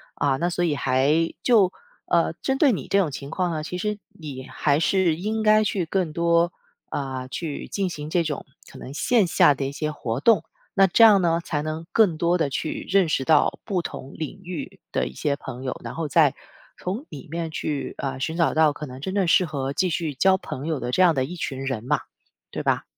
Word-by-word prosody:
啊， 140 -2 +1
那 170 +6 0
所 175 0 0
以 155 -4 +1
还 140 +5 +2
就 210 -7 +5 0.4
呃， - - +3
针 270 0 0
对 275 -3 +4
你 - - -5
这 200 - +3
种 180 -5 +2
情 140 0 -7
况 180 +2 -1
呢， 155 -2 -3
其 180 +3 -5
实， 210 +2 -2 0.2
你 135 -5 -7
还 140 0 +1
是 175 0 +2
应 215 +6 -2
该 215 0 +5
去 195 -4 -1
更 180 -1 -1
多， 170 +1 +2 0.4
呃， 130 -2 -4
去 155 0 -5
进 195 -2 -1
行 150 -3 -6
这 175 +2 +2
种， 150 -3 -4 0.2
可 - - -13
能 130 - -8
线 215 +5 +2
下 150 - +5
的 140 - -4
一 135 - -3
些 155 +2 -3
活 120 -4 -3
动。 225 +8 +4 0.3
那 195 -1 +5
这 225 +5 +6
样 205 -3 +7
呢， 165 -1 +2
才 150 -3 -2
能 155 +2 -4
更 200 -8 +4
多 170 +2 +2
地 160 -5 0
去 150 +3 -3
认 190 -2 +4
识 145 -4 0
到 155 +4 +3
不 190 -5 -1
同 135 -4 -7
领 160 +5 -6
域 175 -5 -7
的 65 - 0
一 65 - -9
些 140 - -1
朋 130 -2 -8
友， 130 - -4
然 - - -6
后 160 -2 -3
再 145 -1 +4 0.4
从 205 +11 -4
里 145 0 -10
面 165 0 -3
去， 150 -3 -3
呃， 135 -1 -3
寻 160 +4 -2
找 170 -1 +2
到 155 -2 +4
可 150 - -7
能 130 -2 -9
真 190 +8 -4
正 195 -2 +2
适 180 +2 +4
合 140 -4 -3
继 185 +6 +1
续 160 -2 -2
交 190 +8 +4
朋 145 -5 -6
友 155 -4 -2
的 120 +1 -3
这 185 - +2
样 175 -3 +5
的 130 - +1
一 175 +7 -6
群 135 -5 -4
人 130 -4 -3
嘛， 145 +2 +1 0.5
对 - - -4
吧？ - - +1
160 Hz, 245 characters per minute, -24 LUFS, 140-180 Hz, 0.5 s, 样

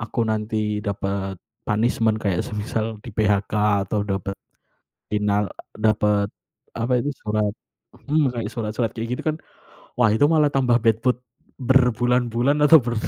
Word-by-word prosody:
Aku 120 0 -1
nanti 105 -1 -1
dapet 100 -2 -3 0.3
punishment 110 0 +1
kayak 95 -5 0
semisal 110 +1 -3
di-PHK 105 -3 0 0.3
atau 105 +2 -1
dapet 100 -1 -3 0.8
final 105 -1 +1 0.2
dapet 105 -2 +1 0.5
apa 115 +2 0
itu 145 - -1
surat 105 -1 0 0.6
hmm. 145 -3 +2
Kayak 105 -2 -3
surat-surat 110 0 -2
kayak 115 0 -4
gitu - - -5
kan, - - -6 0.6
wah, 115 -3 +5
itu 110 +6 +3
malah 155 -2 +4
tambah 125 -3 +3
bad 110 -1 +2
mood 125 -1 +2 0.4
berbulan-bulan 125 0 +2
atau 160 +2 +9
ber 120 0 -2
110 Hz, 135 wpm, -23 LUFS, 105-120 Hz, 0.8 s, atau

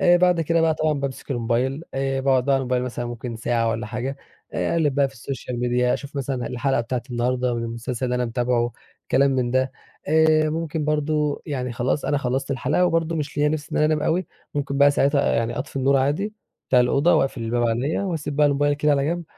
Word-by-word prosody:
آآ 175 0 +6
بعد 180 -1 +3
كده 165 +1 +1
بقى 160 -1 +3
طبعًا 155 0 +1
بامسك 140 -1 -4
الموبايل، 125 +4 0
آآ 135 0 -1
باقعد 130 -2 +2
بقي 140 - +2
على 135 - +2
الموبايل 125 -1 0
مثلًا 120 -1 -4
ممكن 120 0 -6
ساعة 115 0 0
والَّا 110 -1 -3
حاجة، 125 +4 -4 0.4
آآ - - -1
أقلِّب 155 -5 +1
بقي 140 -1 +3
في 135 - -17
الSocial 130 +1 -6
Media 125 0 +1
أشوف 140 0 -5
مثلًا 130 -3 -2
الحلقة 130 +1 0
بتاعة 120 +1 -3
النهارده 125 +1 0
من 115 - -2
المسلسل 115 +2 -4
اللي 125 -1 0
أنا 125 0 0
متابعُه 120 0 0 0.4
كلام 140 +1 +4
من 130 -2 0
ده، 130 +1 +1 0.4
آآ 155 0 +4
ممكن 160 -1 -2
برضه 150 -1 0
يعني 125 -4 -3
خلاص 130 +4 -1
أنا 145 - +1
خلّصت 135 +1 -2
الحلقة، 140 +6 +1
وبرضه 165 -1 0
مش 150 -1 -4
ليا 150 0 +3
نفس 150 -1 -3
إن - - -1
أنا 150 - +3
أنام 155 -1 +1
أوي، 175 +2 0 0.3
ممكن 140 -1 -2
بقى 140 0 +7
ساعتها 140 0 +2
يعني 115 +1 -1
أطفي 140 +1 -6
النُّور 135 +1 +3
عادي 150 +11 0 0.4
بتاع 125 - +5
الأوضة، 140 +7 +3
وأقفِل 135 -5 0
الباب 120 +1 0
علَيّا، 125 +11 0
وأسيب 160 -6 -3
بقي 150 -1 +5
الموبايل 145 0 +2
كده 150 +1 +1
على 140 -1 +1
جَنب، 170 +2 -2
135 Hz, 215 wpm, -23 LUFS, 125-150 Hz, 0.4 s, بقى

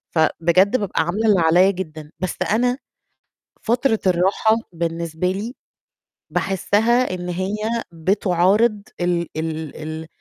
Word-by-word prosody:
فبجد 170 +7 +3
بابقى 200 -6 -1
عاملة 200 +7 -1
اللي 200 -4 +5
عليّا 175 +4 +5
جدًا، 155 -5 -7
بس 185 0 -2 0.2
أنا 245 +4 +2 0.9
فترة 235 0 +1
الراحة 190 +5 +3 0.2
بالنسبة 170 +1 -2
لي 215 +6 -5 0.8
باحسّها 205 +7 +1
إن 180 0 -5
هي 185 +3 -2 0.4
بتعارض 195 +5 +2 0.2
ال 175 -1 0
ال 160 -1 -4
ال 160 +1 -6
185 Hz, 110 wpm, -21 LUFS, 165-210 Hz, 0.9 s, اللي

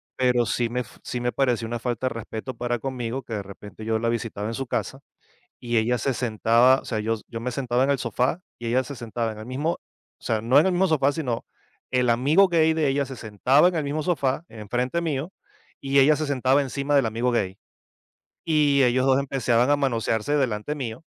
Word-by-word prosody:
Pero 125 -2 +2
sí 120 +1 0
me 125 +1 -2
f - - -12
sí 125 - -4
me 120 0 -1
pareció 125 -4 0
una 120 0 -3
falta 125 +1 -2
de - - -2
respeto 115 +2 -6
para 120 0 -2
conmigo, 130 -1 -4
que 115 - -8
de 100 -2 -3
repente, 100 +2 -11
yo 110 0 0
la 115 - -1
visitaba 110 -3 -3
en 115 - -3
su 135 +1 -4
casa, 120 +2 -3 0.6
y 120 -1 -2
ella 120 +2 +2
se 135 +3 -1
sentaba 120 +2 +3
O - - -19
sea, 110 - -2
yo 115 +1 0
yo 115 - -6
me 125 +2 -3
sentaba 125 0 0
en 140 - +1
el 140 - +2
sofá, 125 +7 -1 0.2
y 120 - -6
ella 130 +2 +2
se 140 - -7
sentaba 115 -1 -3
en 105 - -11
el 110 - -8
mismo 145 +7 -1
o - - -16
sea, 110 -2 0
no 130 +5 +4
en 155 - +5
el 190 - +2
mismo 185 +2 +3
sofá, 145 -4 +2
sino 125 -8 -3 0.5
el 125 -1 +1
amigo 145 +11 +4
gay 160 -2 +3
de 155 -3 +1
ella, 140 +1 +1
se 130 -1 -8
sentaba 125 - +3
en 180 - -3
el 155 -3 -1
mismo 150 +2 -2
sofá, 145 -3 0
enfrente 125 +8 -2
mío, 160 +2 -3 0.5
y 140 0 +1
ella 145 +3 +6
se 155 0 -2
sentaba 135 0 +2
encima 140 +1 -2
del 135 -5 +4
amigo 115 +3 0
gay. 95 -4 -1 0.9
Y 145 -4 +3
ellos 125 +1 +3
2, 130 -1 +4
empezaban 130 -2 +1
a 145 - +4
manosearse, 120 0 0
delante 130 +1 -1
mío. 125 0 -5
125 Hz, 225 wpm, -24 LUFS, 115-140 Hz, 0.9 s, ella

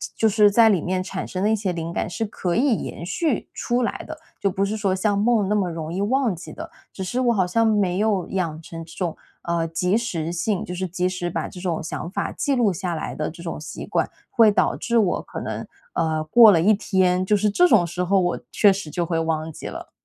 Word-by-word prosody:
就 220 - +3
是 210 0 +5
在 225 +2 +6
里 190 -7 +2
面 185 +1 -1
产 185 0 -5
生 185 - -4
了 205 - +2
一 220 - +3
些 195 -4 -2
灵 165 -1 -4
感 - - -2
是 220 +5 -3
可 185 -4 -3
以 255 -1 +3
延 170 - -6
续 265 - -1
出 245 +1 -1
来 235 - -2
的， 315 0 -8 0.2
就 200 - +1
不 195 +2 -1
是 205 +2 -1
说 200 -3 0
像 200 +1 +1
梦 215 -1 +2
那 210 - +2
么 195 -4 +1
容 160 -1 -5
易 180 - -3
忘 240 0 +1
记 175 - -10
的， 330 +1 -8 0.2
只 190 - -5
是 240 +7 -2
我 240 -2 +3
好 190 -4 +1
像 225 +6 +2
没 205 -5 +2
有 205 -4 +1
养 165 -5 -2
成 165 0 -8
这 165 - -14
种， 175 -4 -3 0.2
呃， 170 -1 -1
及 180 +5 +1
时 170 -8 -3
性 180 +3 -1
就 180 - -6
是 185 +1 -2
及 180 +1 -1
时 180 -2 -3
把 - - -2
这 180 - -10
种 175 -3 -2
想 165 +1 -5
法 - - -2
记 285 - -1
录 235 -5 +3
下 180 -1 -3
来 160 - -4
的 155 0 -3
这 170 - -12
种 170 -2 -5
习 155 - -8
惯。 - - 0 0.2
会 225 -3 +5
导 205 - +2
致 235 -1 +1
我 195 -5 +1
可 - - -7
能， - - -4 0.3
呃， 155 -1 0
过 225 +4 +8
了 165 -4 +3
1 200 +6 +5
天， 185 -3 +1
就 210 - +3
是 210 +1 +2
这 355 - +4
种 190 - +4
时 180 +2 -3
候， 195 +2 +3
我 175 -1 0
确 205 - +5
实 190 -5 -4
就 175 - -1
会 165 0 -1
忘 160 -1 -1
记 - - -11
了。 - - -7
190 Hz, 270 characters per minute, -23 LUFS, 170-215 Hz, 0.3 s, 过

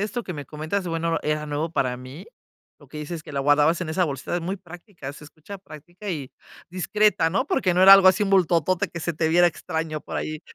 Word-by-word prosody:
esto 215 +4 -3
que 180 - -5
me 145 -4 -7
comentas, 155 +5 -3
bueno, 165 0 -1
era 150 0 -1
nuevo 150 +2 -3
para 130 -6 0
mí, 130 +9 -11 0.5
lo 145 - -19
que 150 - -11
dices 155 +2 -6
que 150 - -11
la 140 - -1
guardabas 145 +4 +3
en 155 - -5
esa 180 +3 +1
bolsita 140 +2 -4
es - - -2
muy 185 +4 -3
práctica, 175 -4 -10
se 150 - -13
escucha 160 +7 -11
práctica 175 +4 -12
y 145 -7 -4 0.4
discreta, 195 -1 +1
¿no?, 195 - -1
porque 185 - +1
no 180 - +3
era 195 +1 +10
algo 195 -1 +9
así 190 +3 +3
bultotote 180 -3 +2
que 170 - -7
se 170 +1 -2
te 160 +1 0
viera 175 +2 +5
extraño 160 -2 -3
por - - -7
ahí. 155 0 -4
165 Hz, 230 wpm, -24 LUFS, 150-185 Hz, 0.5 s, era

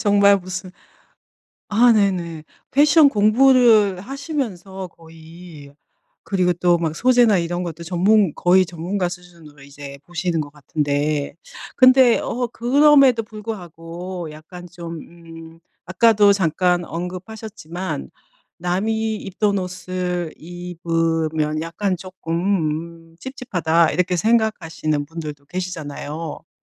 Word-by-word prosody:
정말 200 -1 +5
무슨 185 0 -7 1.0
아 230 +3 +5
네네. 175 -7 0 0.3
패션 295 +2 +6
공부를 220 -3 +4
하시면서 220 - -5
거의 165 -3 -14 0.5
그리고 180 -3 +1
또 175 0 +2
막 160 -2 -2
소재나 245 -5 +4
이런 175 +1 -2
것도 170 -1 -6
전문 190 +1 +2
거의 185 +1 +4
전문가 175 +3 -3
수준으로 170 -5 -13
이제 140 0 -11
보시는 175 -1 -2
것 145 -1 -6
같은데. 145 0 -2 0.4
근데 255 -2 +6
어 245 +1 -2
그럼에도 270 -1 +4
불구하고 180 -5 -7
약간 175 +4 -12
좀 170 -2 -8
음 165 -1 -13 0.3
아까도 205 +2 +4
잠깐 180 -1 +1
언급하셨지만 180 - -6 0.5
남이 220 +5 -1
입던 200 0 -1
옷을 180 -2 -4
입으면 165 -3 -2
약간 180 +3 -2
쪼끔 170 -2 -3
음 - - -24
'찝찝하다.' 175 - 0
이렇게 180 +2 0
생각하시는 175 -8 0
분들도 150 -3 -8
계시잖아요. 160 -2 -6
음 - - -48
180 Hz, 250 characters per minute, -21 LUFS, 165-205 Hz, 1.0 s, 패션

